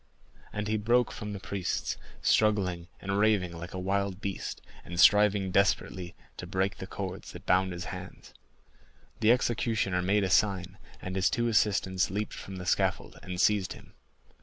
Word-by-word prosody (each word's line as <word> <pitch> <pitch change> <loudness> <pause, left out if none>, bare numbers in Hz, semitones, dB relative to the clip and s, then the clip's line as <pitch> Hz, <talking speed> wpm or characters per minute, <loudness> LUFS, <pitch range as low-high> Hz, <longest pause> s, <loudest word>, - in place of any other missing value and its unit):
And 105 0 -3
he 110 0 +1
broke 120 +3 +2
from 105 0 -6
the 100 - -5
priests 85 -11 -2 0.3
struggling 95 -5 +2
and 95 +1 -1
raving 100 -5 +2
like 85 +3 -7
a - - -3
wild 95 0 -1
beast, 100 -2 -4 0.2
and 85 0 -6
striving 105 -2 +5
desperately 95 -2 +1 0.2
to 90 - -6
break 95 +2 -1
the 95 - -7
cords 95 -1 -6
that 90 +3 -10
bound 95 0 +3
his 90 +2 -5
hands. 90 0 -10 0.9
The 110 0 +5
executioner 110 -6 +1
made 100 +3 +2
a 95 - 0
sign, 95 0 +1 0.2
and 95 0 -4
his 95 0 +3
two 120 0 0
assistants 100 -4 +2
leaped 105 +3 -3
from 95 - -8
the 90 -1 -6
scaffold - - 0
and 90 -1 -6
seized 100 -1 +2
him. - - -15
95 Hz, 165 wpm, -29 LUFS, 90-105 Hz, 0.9 s, striving